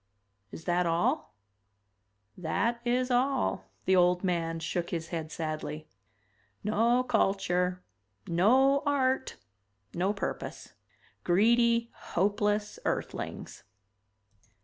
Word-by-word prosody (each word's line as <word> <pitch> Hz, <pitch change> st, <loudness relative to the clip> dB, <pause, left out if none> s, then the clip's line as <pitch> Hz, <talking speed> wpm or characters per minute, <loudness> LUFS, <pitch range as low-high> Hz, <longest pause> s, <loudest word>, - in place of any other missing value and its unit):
"Is 160 Hz, -, -9 dB
that 175 Hz, 0 st, +1 dB
all?" 175 Hz, -, 0 dB, 1.0 s
"That 230 Hz, +8 st, -1 dB
is 250 Hz, +1 st, +1 dB
all." 245 Hz, -, +1 dB, 0.2 s
The 190 Hz, -, +4 dB
old 180 Hz, 0 st, +3 dB
man 165 Hz, -3 st, -1 dB
shook 170 Hz, +1 st, -2 dB
his 165 Hz, -1 st, -4 dB
head 160 Hz, -2 st, -4 dB
sadly. 155 Hz, -1 st, -4 dB, 0.8 s
"No 230 Hz, +4 st, +2 dB
culture, 180 Hz, -5 st, +1 dB, 0.4 s
no 260 Hz, +11 st, +4 dB
art, 265 Hz, -2 st, +1 dB, 0.6 s
no 185 Hz, +3 st, +1 dB
purpose. 200 Hz, -, -5 dB, 0.5 s
Greedy, 230 Hz, +5 st, +3 dB
hopeless 205 Hz, +2 st, -1 dB
Earthlings." -, -, -4 dB
195 Hz, 90 wpm, -29 LUFS, 170-240 Hz, 1.0 s, The